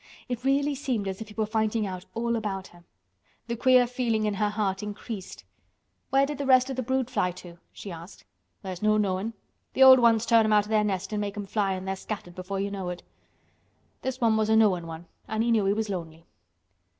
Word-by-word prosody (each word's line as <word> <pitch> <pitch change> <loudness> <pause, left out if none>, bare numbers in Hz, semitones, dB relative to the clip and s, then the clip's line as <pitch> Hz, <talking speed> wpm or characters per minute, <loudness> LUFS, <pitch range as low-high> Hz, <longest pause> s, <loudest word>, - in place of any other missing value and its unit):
It 245 -1 -4
really 280 +2 +2
seemed 255 -7 -2
as 190 +2 -4
if 220 - -6
he 210 - -13
were 220 - 0
finding 220 0 0
out 185 -1 -6
all 235 +1 0
about 195 -4 -4
her. 175 0 -19 0.6
The 235 - -3
queer 255 +1 +5
feeling 235 -3 -1
in 210 - 0
her 210 +1 0
heart 205 -2 -1
increased. 210 -1 -7 0.7
"Where 270 +1 +4
did 290 0 -5
the 280 - -2
rest 260 0 +5
of - - -4
the 260 - -1
brood 260 0 -1
fly 210 -8 0
to?" 175 -1 -12
she 200 - -9
asked. 170 +3 -11 0.4
"There's 185 -2 -6
no 215 0 +3
knowin'. 200 +2 -1 0.4
The 265 - +5
old 260 -1 +10
ones 230 -2 +4
turn 230 -1 +5
'em 215 0 +2
out 210 -1 +4
o' - - -12
their 215 -1 +3
nest 195 0 -2
an' 210 - -1
make 205 0 -4
'em 205 - -4
fly 195 -1 0
an' 185 0 -5
they're 190 0 -2
scattered 190 -3 -7
before 185 +2 -5
you 200 +1 -2
know 190 -3 -4
it. 180 0 -6 1.0
This 260 0 -3
one 225 -3 +3
was 215 0 +1
a 220 - +4
knowin' 190 -6 +3
one 165 +1 -8 0.2
an' 220 +1 -1
he 235 - +1
knew 215 -3 +3
he 195 - +3
was 220 +1 -2
lonely." 165 -4 -6
215 Hz, 230 wpm, -27 LUFS, 195-235 Hz, 1.0 s, old